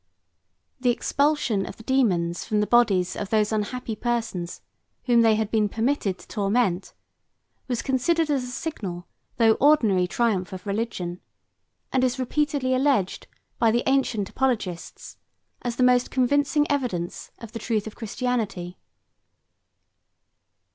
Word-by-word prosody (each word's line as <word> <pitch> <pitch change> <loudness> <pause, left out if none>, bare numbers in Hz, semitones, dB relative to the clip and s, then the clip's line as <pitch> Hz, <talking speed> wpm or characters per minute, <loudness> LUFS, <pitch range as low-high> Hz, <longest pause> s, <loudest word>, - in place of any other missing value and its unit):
The 250 -1 +2
expulsion 275 -4 +1
of - - -8
the 225 - -12
dæmons 180 -10 +1
from 215 - 0
the 210 - +2
bodies 200 -7 +3
of 200 - -4
those 215 -1 +2
unhappy 220 +2 -2
persons 225 -8 -3 0.4
whom 240 -2 +4
they 225 -1 +5
had 215 -1 -1
been 215 -2 +2
permitted 220 -4 0
to - - -16
torment, 200 -2 0 0.7
was 245 -3 -2
considered 305 +5 +1
as 275 -3 +1
a - - -6
signal 205 - -5 0.3
though 225 -2 +5
ordinary 220 -11 +4
triumph 195 -4 0
of 185 +1 -8
religion, 200 -4 -3 0.7
and 260 - +2
is 255 0 +1
repeatedly 275 0 0
alleged 255 -8 +1 0.3
by 230 - +4
the 235 +2 +1
ancient 255 -7 +1
apoligists, 215 -10 -2 0.4
as 240 -1 -3
the 255 - +1
most 250 0 +4
convincing 285 +3 +2
evidence 220 -11 -2
of 230 -2 -10
the 230 - -6
truth 220 -3 -1
of 220 - -7
Christianity. 220 -6 -3
230 Hz, 135 wpm, -25 LUFS, 200-255 Hz, 0.7 s, they